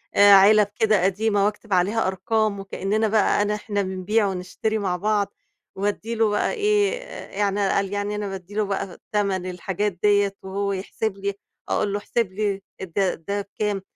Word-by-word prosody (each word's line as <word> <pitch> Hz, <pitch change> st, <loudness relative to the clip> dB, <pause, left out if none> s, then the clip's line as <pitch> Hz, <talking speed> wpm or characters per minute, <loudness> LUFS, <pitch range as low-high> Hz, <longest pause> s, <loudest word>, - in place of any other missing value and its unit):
آآ 200 Hz, 0 st, +8 dB
علب 205 Hz, +2 st, +7 dB
كده 215 Hz, -4 st, +3 dB
قديمة 200 Hz, +1 st, +2 dB
واكتب 210 Hz, 0 st, -2 dB
عليها 195 Hz, +5 st, +2 dB
أرقام 200 Hz, +2 st, 0 dB
وكأننا 195 Hz, +3 st, -1 dB
بقى 215 Hz, -1 st, +3 dB
أنا 210 Hz, 0 st, +1 dB
إحنا 205 Hz, -1 st, -2 dB
بنبيع 190 Hz, +3 st, 0 dB
ونشتري 190 Hz, +4 st, -2 dB
مع 190 Hz, -4 st, -1 dB
بعض. 205 Hz, +1 st, 0 dB, 0.4 s
وادّي 205 Hz, +3 st, -2 dB
له 225 Hz, -1 st, +3 dB
بقى 210 Hz, -, +1 dB
إيه، 420 Hz, 0 st, +2 dB, 0.4 s
يعني 200 Hz, -1 st, +1 dB
قال 195 Hz, 0 st, 0 dB
يعني 205 Hz, +1 st, -2 dB
أنا 210 Hz, 0 st, -3 dB
بادّي 190 Hz, 0 st, -8 dB
له 215 Hz, 0 st, +1 dB
بقى 195 Hz, -2 st, -3 dB
تَمَن 195 Hz, -3 st, 0 dB
الحاجات 190 Hz, +3 st, -2 dB
ديّة 205 Hz, -1 st, +3 dB
وهو 200 Hz, +1 st, -2 dB
يحسب 195 Hz, +2 st, -3 dB
لي، 200 Hz, 0 st, -2 dB, 0.4 s
أقول 205 Hz, -1 st, 0 dB
له 205 Hz, -, 0 dB
احسب 215 Hz, -1 st, -1 dB
لي 200 Hz, -1 st, -1 dB, 0.2 s
ده 190 Hz, +1 st, 0 dB
ده 200 Hz, +5 st, -3 dB
بكام؟ 200 Hz, 0 st, -3 dB
205 Hz, 170 wpm, -23 LUFS, 195-215 Hz, 0.4 s, آآ